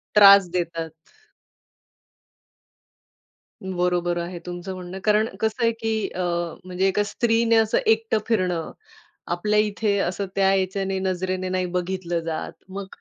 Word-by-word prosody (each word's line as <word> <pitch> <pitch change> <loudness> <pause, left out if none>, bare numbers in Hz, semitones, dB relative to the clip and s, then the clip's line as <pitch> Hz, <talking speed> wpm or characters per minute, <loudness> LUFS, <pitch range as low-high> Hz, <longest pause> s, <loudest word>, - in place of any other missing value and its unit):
त्रास 200 -3 +8
देतात. 165 -2 -2 2.7
बरोबर 180 -2 0
आहे 175 +1 -5
तुमचं 180 +2 -6
म्हणणं, 185 +1 -7
कारण 215 +1 +3
कसं 220 +2 -1
आहे 230 - +4
की 220 -1 -1
अ, 185 - -5 0.5
म्हणजे 185 +1 0
एका 205 +2 +2
स्त्रीने 230 +1 +2
असं 220 -1 +3
एकटं 225 0 +2
फिरणं, 180 -7 0 0.6
आपल्या 210 +5 +1
इथे 210 -1 +1
असं 190 +2 -1
त्या 195 0 +3
याच्याने 190 0 -1
नजरेने 185 0 -2
नाही 185 0 0
बघितलं 180 -1 -2
जात. 160 -1 -3 0.2
मग 195 0 -6
190 Hz, 125 wpm, -24 LUFS, 180-210 Hz, 2.7 s, त्रास